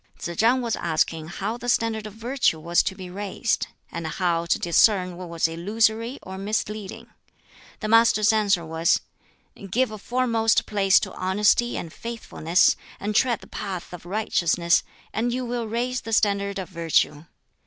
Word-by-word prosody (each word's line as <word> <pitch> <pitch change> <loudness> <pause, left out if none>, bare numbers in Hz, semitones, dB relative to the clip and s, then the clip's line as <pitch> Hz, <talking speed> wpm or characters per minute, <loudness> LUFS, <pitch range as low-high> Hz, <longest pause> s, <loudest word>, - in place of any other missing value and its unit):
Tsz 170 - -5
chang 245 +3 +3
was 230 -2 0
asking 160 -1 -1
how 200 +6 -4
the 245 0 -5
standard 225 -2 0
of 210 - -10
virtue 235 -7 0
was 170 +2 +2
to 190 - -3
be 185 -2 -8
raised, 205 +4 -2 0.2
and 170 -1 -4
how 170 +1 -1
to - - +2
discern 180 +1 +3
what 180 0 -8
was 165 -1 +1
illusory 220 +8 0
or 190 0 -8
misleading. 210 0 -4 0.7
The 215 - -2
Master's 220 -1 +5
answer 200 -5 +2
was, 160 +1 +1 0.7
"Give 245 +4 +1
a 215 - -7
foremost 230 -1 +1
place 195 -2 +4
to 190 - -5
honesty 210 +5 +2
and 165 - -6
faithfulness, 220 -7 +1 0.2
and 210 +1 -3
tread 240 -1 +2
the - - -12
path 185 -3 -6
of 175 0 -9
righteousness, 175 -4 +2 0.3
and 240 +2 0
you 250 +1 -2
will 240 -1 -3
raise 245 +3 -2
the 225 - -6
standard 200 -1 +1
of 190 -2 -5
virtue. 165 -3 0
205 Hz, 165 wpm, -24 LUFS, 175-225 Hz, 0.7 s, Master's